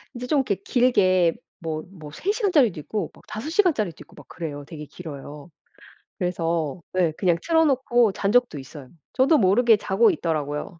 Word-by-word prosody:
이제 245 +1 -6
좀 290 +2 +2
이렇게 255 -7 0
길게 190 -6 +2 0.2
뭐 155 -1 -4
뭐 155 -6 -11
3 385 - -1
시간짜리도 335 - +2
있고 200 +2 -4
막 - - -19
5 220 +8 -6
시간짜리도 315 - +1
있고 - - -16
막 - - -15
그래요. 150 -4 -6
되게 150 0 -9
길어요. 150 -1 -10 0.7
그래서 170 -3 -2
네 180 -3 +1
그냥 175 +1 +1
틀어 325 -1 +3
놓고 245 -6 +2
잔 195 +1 -1
적도 245 -10 +2
있어요. 135 0 -11 0.2
저도 275 +4 +4
모르게 225 +3 +4
자고 205 +2 +2
있더라고요. 155 +2 -3
185 Hz, 345 characters per minute, -24 LUFS, 160-245 Hz, 0.7 s, 저도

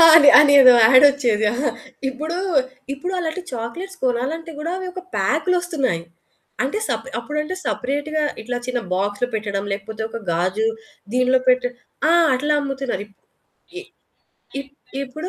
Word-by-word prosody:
అని 285 -3 +9
అనేదో 280 -4 +8
యాడ్ 255 +4 +7
వచ్చేది. 240 -7 0
అహా! 260 +3 -1 0.4
ఇప్పుడు, 310 +6 -5 0.6
ఇప్పుడు 360 +7 -5
అలాంటి 330 +2 -3
చాక్లేట్స్ 345 +12 -6
కొనాలి 255 +4 0
అంటే 330 0 -10
గూడా 335 +3 -3 0.2
ఒక 370 - -7 0.2
పాకులోస్తున్నాయి. 340 - 0 0.6
అంటే 285 +11 -2
సప్ - - -3
అప్పుడు 295 +1 -6
అంటే 370 +5 -5
సెపరేట్‌గా 290 +4 -2 0.2
ఇట్లా 245 +2 -4
చిన్న 250 -1 -1
బాక్స్‌లో 205 +5 -1
పెట్టడం 200 -2 -3
లేకపోతే 215 +2 -5
ఒక 230 - -6
గాజు 185 +6 0 0.5
దీంట్లో 255 +1 +3
పెట్ట 255 0 +4 0.5
ఆ! - - +5 0.2
అట్లా 295 +3 0
అమ్ముతున్నారు 270 -7 -3
ఇప్ 200 - -28 0.6
ఈ - - -8 0.8
ఇప్ 275 0 -11 0.3
ఇప్పుడు 310 +7 -6
265 Hz, 135 wpm, -21 LUFS, 235-310 Hz, 0.8 s, అని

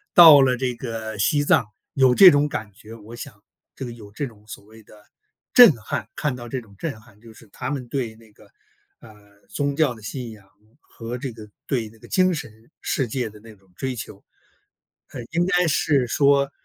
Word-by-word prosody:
到 160 -6 +10
了 130 -2 +2
这 125 -1 -2
个 115 -3 -6
西 145 +8 +2
藏 115 - +3 0.3
有 130 -2 +4
这 190 +3 +10
种 145 +1 +2
感 110 -6 -5
觉， 110 +3 -14
我 115 +1 -12
想 105 -3 -10 0.3
这 135 - -6
个 120 - -7
有 105 -3 -13
这 140 +7 -4
种 110 -5 -13
所 100 - -11
谓 110 +1 -17
的 105 0 -19 0.5
震 245 -7 +9
撼， 105 - -5
看 145 -4 -2
到 120 -1 -9
这 130 - -3
种 105 -4 -17
震 135 -4 -5
撼， 110 -2 -22
就 115 -1 -15
是 115 - -18
他 - - -6
们 130 -4 -5
对 120 -4 -4
那 110 -1 -20
个， - - -20 0.5
呃， 105 -2 -19
宗 145 -1 -2
教 145 -5 +2
的 110 - -15
信 120 +2 -6
仰 100 -3 -16 0.3
和 115 +2 -8
这 130 0 -5
个 110 -2 -12 0.2
对 120 -7 -2
那 110 - -20
个 - - -16
精 185 0 +2
神 110 -5 -9
世 135 -5 -1
界 120 -1 -3
的 105 - -15
那 110 0 -15
种 95 -2 -29
追 130 -1 -3
求。 105 -3 -9 0.9
呃， 125 - -7
应 175 +2 +1
该 180 -3 +2
是 145 -4 +1
说， 140 +2 +2
120 Hz, 225 characters per minute, -22 LUFS, 110-140 Hz, 0.9 s, 到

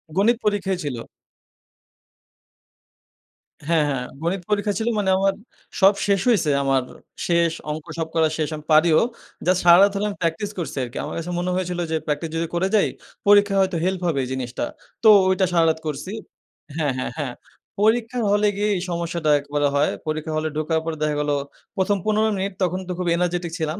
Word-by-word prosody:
গণিত 225 +4 +3
পরীক্ষাই 200 -2 0
ছিল। 140 -5 -3 2.7
হ্যাঁ, 165 -2 +3
হ্যাঁ 125 -3 -2 0.2
গণিত 175 +3 -1
পরীক্ষা 205 0 +1
ছিল 220 - -2
মানে 195 -2 0
আমার 195 0 +2 0.5
সব 195 +2 +7
শেষ 200 -1 +3
হইসে 180 -10 +3
আমার 135 -1 +2 0.4
শেষ 170 -1 +3 0.2
অঙ্ক 155 0 -5
সব 160 - -1
করা 160 -1 +4
শেষ 155 -2 -1
আমি 150 - -9
পারিও। 155 0 +5 0.5
জাস্ট 185 0 +3
সারারাত 185 +4 +7
হলে 200 - -1
আমি 200 - -7
প্র্যাকটিস 170 +5 -1
করসি 155 -5 -4
আরকি। 120 -1 -7
আমার - - -5
কাছে 170 +2 -4
মনে 180 +1 -1
হয়েছিল 180 -1 -2
যে 160 - +1
প্র্যাকটিস 150 +2 -2
যদি 165 +1 -1
করে 185 +2 +1
যাই 210 - +4 0.4
পরীক্ষা 205 -1 +5
হয়তো 185 -2 0
হেল্প 185 -1 -1
হবে 145 -5 +1
জিনিসটা। 125 -1 -3 0.4
তো 220 - +8 0.2
ওইটা 190 0 +2
সারারাত 165 -2 +3
করসি 150 +6 -4 0.6
হ্যাঁ, 150 -4 0
হ্যাঁ, 130 - -3
হ্যাঁ 135 -4 -3 0.5
পরীক্ষার 230 +2 +1
হলে 210 0 +3
গিয়ে 210 +1 +1
এই 180 - -2
সমস্যাটা 170 -2 -2
একবারে 145 0 -1
হয়। 140 - +2 0.2
পরীক্ষা 155 0 -3
হলে 155 0 -1
ঢোকার 160 +1 0
পর 165 - -2
দেখা 150 -1 +1
গেল 150 - -2 0.5
১ম 195 +2 +2
১৫ 215 +1 +2
মিনিট 195 +1 -2
তখন 185 +1 0
তো - - -4
খুব 180 - -2
এনার্জেটিক 175 -1 -1
ছিলাম। 160 +4 -2
175 Hz, 175 wpm, -22 LUFS, 155-195 Hz, 2.7 s, তো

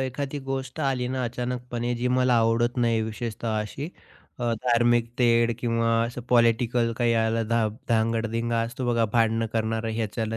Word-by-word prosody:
एखादी 135 +2 -3
गोष्ट 135 -1 -4
आली 130 -3 0
ना 130 0 -2
अचानकपणे, 120 0 -3
जी 125 +1 -1
मला 125 -1 +3
आवडत 115 +2 +2
नाही 115 -2 +2
विशेषतः 110 0 -3
अशी 135 +8 -5 0.5
अ, 120 -1 0
धार्मिक 120 -1 +3
तेढ, 120 -1 +4
किंवा 115 -1 0 0.2
असं 125 +1 -6
पॉलिटिकल 115 0 +3
काही 120 -1 +2
याला 115 0 +1
धा 115 -1 +2 0.2
धांगड-धिंगा 115 0 0
असतो 120 +2 -3
बघा, 115 -1 +2
भांडणं 115 -1 +2
करणारं. 115 0 -1
ह्याच्याला 110 0 -2
115 Hz, 150 wpm, -25 LUFS, 115-125 Hz, 0.5 s, तेढ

